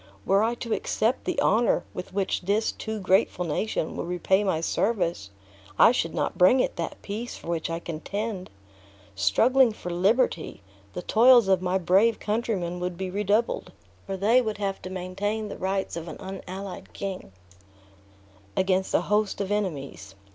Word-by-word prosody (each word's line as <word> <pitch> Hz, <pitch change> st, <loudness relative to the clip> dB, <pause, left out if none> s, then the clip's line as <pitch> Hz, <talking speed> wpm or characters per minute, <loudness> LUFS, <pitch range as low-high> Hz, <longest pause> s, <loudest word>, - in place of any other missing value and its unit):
Were 195 Hz, +1 st, +4 dB
I 230 Hz, +2 st, +1 dB
to 235 Hz, -2 st, -3 dB
accept 225 Hz, +4 st, 0 dB
the 360 Hz, -5 st, -1 dB
honor 230 Hz, +1 st, +3 dB
with 180 Hz, -, -7 dB
which 195 Hz, 0 st, -1 dB
this 205 Hz, +4 st, +1 dB
too 220 Hz, 0 st, -5 dB
grateful 190 Hz, -1 st, +2 dB
nation 165 Hz, +1 st, -2 dB
would -, -, -4 dB
repay 190 Hz, +3 st, +1 dB
my 190 Hz, -5 st, 0 dB
service, 170 Hz, -, -1 dB, 0.5 s
I -, -, +7 dB
should 165 Hz, -9 st, -1 dB
not -, -, -2 dB
bring 185 Hz, +9 st, +6 dB
it -, -, 0 dB
that 170 Hz, -, -4 dB
peace 220 Hz, +4 st, -5 dB
for -, -, -10 dB
which 170 Hz, -1 st, -2 dB
I 165 Hz, -, -2 dB
contend. 185 Hz, +4 st, -5 dB, 0.6 s
Struggling 225 Hz, -, +4 dB
for 180 Hz, -4 st, -7 dB
liberty, 185 Hz, -, +1 dB, 0.3 s
the 180 Hz, -, -5 dB
toils 240 Hz, -1 st, +6 dB
of 190 Hz, -2 st, +3 dB
my 185 Hz, +1 st, +1 dB
brave 195 Hz, +5 st, +3 dB
countrymen 210 Hz, -6 st, -2 dB
would 180 Hz, -1 st, -3 dB
be 185 Hz, 0 st, -4 dB
redoubled; 210 Hz, +4 st, 0 dB, 0.3 s
for 195 Hz, -1 st, -3 dB
they 225 Hz, +6 st, +4 dB
would 220 Hz, -3 st, -3 dB
have 195 Hz, -1 st, -3 dB
to 185 Hz, -, -7 dB
maintain 195 Hz, +4 st, -3 dB
the -, -, -6 dB
tights 190 Hz, -1 st, -2 dB
of 170 Hz, 0 st, -6 dB
an 160 Hz, -, -7 dB
unallied 190 Hz, 0 st, -7 dB
king 190 Hz, -, -6 dB, 1.3 s
against 190 Hz, 0 st, +1 dB
a -, -, +4 dB
host 210 Hz, 0 st, 0 dB
of 200 Hz, 0 st, -2 dB
enemies. 140 Hz, -, -3 dB
195 Hz, 165 wpm, -26 LUFS, 180-215 Hz, 1.3 s, I